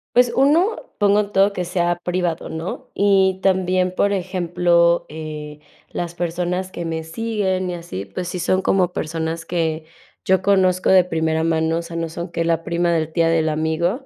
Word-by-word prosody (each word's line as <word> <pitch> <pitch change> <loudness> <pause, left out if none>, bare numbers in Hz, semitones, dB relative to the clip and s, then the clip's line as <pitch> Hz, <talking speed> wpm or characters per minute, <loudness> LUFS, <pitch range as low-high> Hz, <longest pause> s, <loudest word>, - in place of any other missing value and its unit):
Pues 245 -1 +5
1, 325 - +3 0.2
pongo 205 0 +3
todo 195 +1 +3
que 180 -2 -3
sea 175 -1 0
privado, 175 -2 -2
¿no? 160 +3 -6
Y 190 -2 +3
también, 185 -1 +1
por 200 0 +2
ejemplo, 175 -2 +1
eh, 150 -1 -7 0.3
las 170 -1 -4
personas 175 +2 -2
que 170 - -5
me 160 -1 -3
siguen 190 0 -2
y - - -4
así, 165 - -6
pues 135 - -6
sí 180 - -4
son 185 +2 +1
como 185 -2 +1
personas 165 +1 -3
que 165 -2 -2 0.4
yo 190 0 +2
conozco 185 -2 +3
de 185 -1 +7
primera 160 -2 -1
mano, 160 0 +1
o - - -3
sea, 170 0 -9
no 165 -1 -2
son 170 +1 -6
que 165 0 -1
la 165 -1 +1
prima 170 0 0
de 165 - +2
la - - -20
tía 165 0 +2
del 160 -1 +2
amigo, 160 - -1
175 Hz, 185 wpm, -21 LUFS, 165-190 Hz, 0.4 s, de